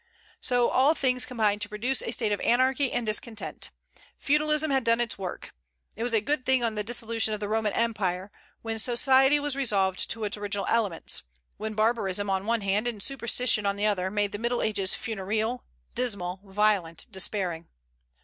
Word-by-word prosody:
So 245 -1 +2
all 280 +5 +4
things 250 -3 +1
combined 215 -4 0
to 205 - -2
produce 240 +6 -1
a - - -4
state 225 -2 0
of 205 - 0
anarchy 260 +2 +2
and 245 - -1
discontent. 215 +1 -2 0.5
Feudalism 300 +1 +1
had 265 -2 +2
done 230 0 +3
its 240 -1 0
work. 185 -2 -6 0.4
It 225 - -8
was 240 +1 0
a - - +5
good 285 +4 -1
thing 260 -1 +2
on 230 -2 +1
the 210 -1 -2
dissolution 225 -1 +1
of - - -8
the 205 - -3
Roman 215 0 0
Empire, 200 -4 -1 0.3
when 225 0 -3
society 265 +4 +4
was 290 -1 -1
resolved 200 -8 +1
into 225 -1 -3
its 210 0 0
original 205 -1 -2
elements, 210 -7 0 0.4
when 215 0 -5
barbarism 205 -3 0
on 190 0 +1
the 200 - -10
one 230 -1 +1
hand, 200 +4 0
and 215 -5 -3
superstition 240 -5 +1
on 200 - +1
the 205 +1 -1
other, 190 -3 +1
made 205 0 0
the 205 - -5
Middle 235 +1 -1
Ages 200 -3 +1
funereal, 220 +3 -3 0.3
dismal, 200 -7 -2
violent, 195 -4 0
despairing. 185 -4 -2
220 Hz, 185 wpm, -27 LUFS, 205-245 Hz, 0.5 s, a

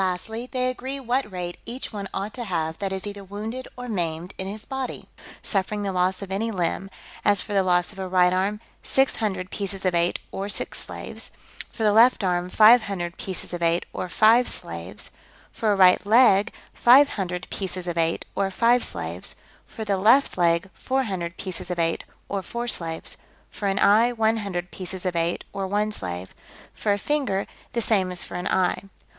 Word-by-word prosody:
Lastly, 220 +7 -3
they 255 -1 0
agree 260 +2 -5
what 255 -3 -1
rate 175 -1 -5
each 245 +1 -5
one 200 -2 -4
ought 200 +2 -4
to 245 -2 -5
have 160 -4 -2
that 195 -1 -2
is 190 0 -3
either 205 -1 -6
wounded 215 +6 -6
or 250 0 -6
maimed 175 -3 -3
in 190 - -3
his 210 +2 -6
body, 265 -2 -5 0.4
suffering 205 +1 -1
the 200 - -1
loss 185 +1 0
of 190 - -8
any 215 +4 -1
limb; 190 -1 -1 0.3
as, 205 -2 +4
for 205 - -3
the 195 - +4
loss 180 -1 +2
of 195 - -12
a 190 - -3
right 180 -1 +4
arm, 195 +3 0 0.2
six 270 0 +2
hundred 190 -4 -2
pieces 195 -1 -4
of 185 - +2
eight, 170 0 +2
or 195 +1 -4
six - - -2
slaves; - - -5 0.4
for 225 - -5
the 210 - +5
left 230 +1 +6
arm, 180 -1 0
five 220 +5 +7
hundred 180 -4 -4
pieces 185 -1 -5
of 175 - -4
eight, 170 +1 +2
or 180 - -4
five 230 +6 +5
slaves; - - -6 0.4
for 220 -2 0
a - - +3
right 185 -2 +6
leg, 210 -1 +5 0.2
five 270 +4 +7
hundred 180 -2 -4
pieces 185 -2 -3
of 175 - -2
eight, 165 0 0
or 195 -1 0
five 235 +5 +3
slaves; - - -3 0.3
for 220 - -7
the 200 -2 +1
left 230 +8 +4
leg, 170 0 +2
four 265 +1 -1
hundred 175 -6 -4
pieces 185 -2 -5
of 180 - -2
eight, 165 -1 0 0.2
or 200 -1 -2
four 235 +5 -4
slaves; 165 -7 -2 0.3
for 205 - -3
an 195 0 0
eye, 225 +4 +5
one 225 -1 +2
hundred 180 -4 -4
pieces 185 0 -6
of 180 -1 -1
eight, 170 +1 0
or 195 -1 -2
one 210 +2 0
slave; 90 - -5 0.4
for 210 - -1
a 200 - +2
finger, 225 -6 0 0.3
the 235 - 0
same 195 -5 +2
as 180 - -1
for - - -11
an 180 +1 -3
eye. 185 -1 +1
195 Hz, 200 wpm, -25 LUFS, 180-220 Hz, 0.4 s, five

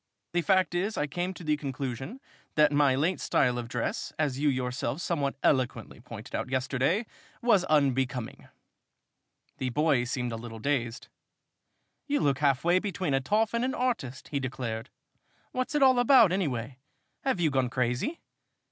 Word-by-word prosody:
"The 175 - +2
fact 185 0 +2
is 195 +5 -1
I 150 - +1
came 175 +5 -3
to - - -10
the 155 -1 +2
conclusion 135 - -5 0.4
that 150 -1 +5
my 145 -2 +4
late 165 +7 +1
style 125 -3 +1
of 120 - -5
dress, 120 -1 -3
as 140 -4 0
you 150 0 +3
yourself 130 +2 -2
somewhat 145 -6 -1
eloquently 125 -5 0
pointed 115 -1 -10
out - - -2
yesterday, 135 - 0 0.4
was 210 -6 +4
unbecoming." 135 -6 0 1.1
The 130 - -1
boy 140 -2 +2
seemed 125 -1 -2
a 115 - -3
little 115 0 -8
dazed. 120 -1 -2 1.0
"You 290 0 +1
look 140 -2 +1
half 140 -3 +2
way 175 +2 +4
between 185 -6 -2
a 135 - +2
toff 210 - +1
and 235 +1 +1
an 260 +1 -1
artist!" 230 - -2
he 140 - -1
declared. 125 -4 -4 0.6
"What's 255 +3 -2
it 290 - +4
all 260 -2 +6
about, 245 -6 +6
anyway? 135 - -2 0.4
Have 265 -9 0
you 160 -3 +2
gone 130 -2 +1
crazy?" 125 - -1
140 Hz, 165 wpm, -28 LUFS, 125-180 Hz, 1.1 s, all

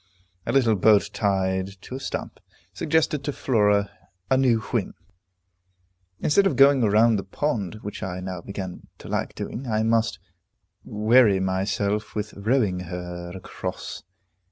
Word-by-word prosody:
A - - +1
little 120 -5 +3
boat 105 +1 +4
tied 95 -2 -1
to - - -9
a 130 - -4
stump, 135 - -5 0.3
suggested 155 -2 +1
to 145 - -1
Flora 105 -7 +2 0.4
a - - +6
new 130 -4 +3
whim. 110 -3 -2 1.2
Instead 195 +6 +3
of - - 0
going 135 -1 +6
round 110 0 +4
the - - -4
pond, 105 - -2
which 105 - -6
I 90 -1 -4
now 90 -1 -5
began 95 -1 -7
to - - -12
like - - -2
doing, 130 +3 -5
I 110 -1 +1
must 115 -2 +1 0.7
weary 110 -1 +4
myself 100 +2 -1
with 105 0 -3
rowing 105 -3 +1
her 90 0 -6
across. 95 - -6
105 Hz, 140 wpm, -24 LUFS, 95-120 Hz, 1.2 s, a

